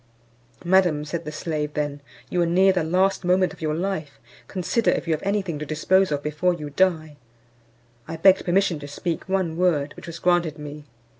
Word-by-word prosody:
"Madam," 175 -5 +3
said 165 +2 -5
the 150 - -5
slave 155 -1 -3
then, 145 -1 -2 0.3
"you 180 - 0
are - - +3
near 190 +3 +4
the 180 -3 0
last 185 +4 +1
moment 180 +1 +2
of - - -16
your 155 -1 -1
life, 170 -5 -3 0.3
consider 195 +5 0
if - - 0
you 165 - +2
have 155 - -2
any 200 +1 0
thing 170 -5 -5
to - - -4
dispose 185 +4 +2
of 145 -1 -1
before 150 +4 0
you 150 -3 -7
die." 155 -3 +1 0.9
I 165 0 -5
begged 190 +3 +5
permission 180 -2 +1
to 145 - -8
speak 165 +5 -4
one 185 -4 0
word, 155 -6 +1
which - - -11
was 170 0 -7
granted 175 -4 +1
me. 150 0 -9
170 Hz, 200 wpm, -24 LUFS, 150-185 Hz, 0.9 s, begged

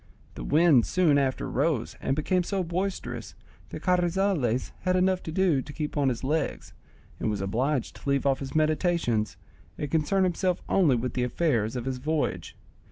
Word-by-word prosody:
The - - -7
wind 150 -6 +4
soon 160 -6 +3
after 135 -2 -1
rose 140 -2 0
and 135 - 0
became 180 +5 +1
so 190 +1 -1
boisterous 185 +3 -4 0.3
that - - -8
Carrizales 175 - +1
had 185 -1 0
enough 185 0 +2
to 160 - -6
do 170 -5 +2
to 145 - -9
keep 150 0 -4
on 140 -3 +2
his 120 0 -4
legs, 150 +3 -2 0.5
and - - -1
was 105 -2 -2
obliged 120 +8 -1
to - - -6
leave 140 0 +1
off 135 -1 +2
his 135 +1 -6
meditations, 155 - +1 0.4
and 145 -2 -4
concern 165 +5 +2
himself 180 0 0
only 165 -9 +3
with 125 +2 -2
the 125 - -1
affairs 125 -5 0
of 125 -1 -3
his 130 -1 -3
voyage. 155 +3 -2
150 Hz, 175 wpm, -27 LUFS, 130-175 Hz, 0.5 s, wind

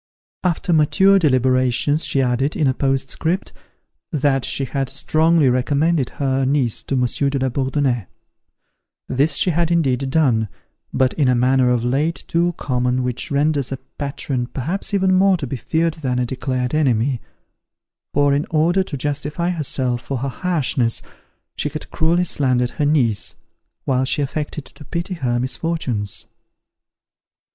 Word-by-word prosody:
After 175 0 0
mature 190 +6 +4
deliberations, 130 0 +2
she 135 - +1
added, 130 +4 0
in 155 - +1
a 130 - +3
postscript, 135 +7 -1 0.6
that 140 -4 +1
she 135 - -1
had 135 +1 -2
strongly 155 +2 +2
recommended 140 +3 +1
her 135 -1 0
niece 130 -4 +1
to 135 - -3
Monsieur 125 +2 +1
de 140 - -1
la 130 0 0
Bourdonnais. 130 - -1 1.0
This 140 +5 +1
she 180 - +2
had 170 +1 +1
indeed 135 -6 +1
done, 130 -7 +2 0.4
but 130 -1 +2
in 145 -4 +1
a 125 - +3
manner 125 +1 +3
of 120 -2 +1
late 145 +7 0
too 170 +1 +1
common 125 -1 0
which 125 -1 -2
renders 140 -2 +1
a 135 - -2 0.2
patron 135 -3 -2
perhaps 165 - -3
even 190 -2 +2
more 190 0 +4
to 150 - -4
be 135 - -4
feared 160 +6 0
than 135 -6 -2
a 125 - +1
declared 125 0 -2
enemy; 130 -4 +1 0.9
for, 145 0 +3
in 145 +2 0
order 165 +4 +2
to 165 -6 -4
justify 150 +5 -2
herself 130 -7 0
for 135 - -4
her 135 +3 -2
harshness, 135 -7 -1 0.5
she 150 - -1
had 155 +1 -8
cruelly 170 +2 +2
slandered 125 -6 +1
her 145 - -1
niece, 125 -9 +1 0.5
while 130 -1 +1
she 145 +2 0
affected 150 +1 -4
to - - -13
pity 170 +6 -4
her 125 -8 -1
misfortunes. 130 - -2
140 Hz, 150 wpm, -20 LUFS, 125-160 Hz, 1.0 s, mature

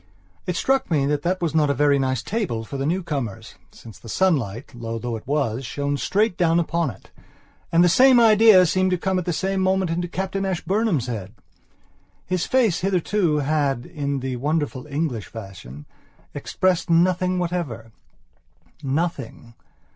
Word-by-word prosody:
It 180 - -1
struck 270 +7 +1
me 150 -5 +2
that 145 0 0
that 180 +3 -1
was 165 - -1
not 155 -2 +2
a 140 - +1
very 145 +1 +3
nice 130 -2 -1
table 180 - -2
for 125 - -8
the 135 +1 -2
newcomers, 140 - -3 0.2
since 115 -3 -14
the 115 - -12
sunlight, 135 - 0
low 115 -1 -5
though 120 0 -4
it 110 - -9
was, 135 -4 -1
shone 140 +4 -2
straight 195 - 0
down 170 -1 +3
upon 170 -2 0
it, 100 - -13 0.6
and 170 +1 +5
the - - +5
same 250 +7 +6
idea 215 -4 +7
seemed 185 +2 +1
to 180 - +1
come 190 +1 -1
at 180 - -5
the 175 - -1
same 190 +3 -1
moment 190 -2 +1
into 175 +1 -2
Captain 190 +2 -3
Ashburnham's 190 - 0
head. 105 -6 -6 0.9
His 185 -1 -1
face 235 -9 +2
hitherto 185 -2 0
had, 140 -4 0
in 140 -4 -3
the 130 -1 -3
wonderful 145 0 -2
English 140 -7 -3
fashion, 95 - -10 0.5
expressed 185 -1 -1
nothing 180 +2 +2
whatever. 165 -11 -3 0.9
Nothing. 140 -4 -3
160 Hz, 160 wpm, -22 LUFS, 130-185 Hz, 0.9 s, idea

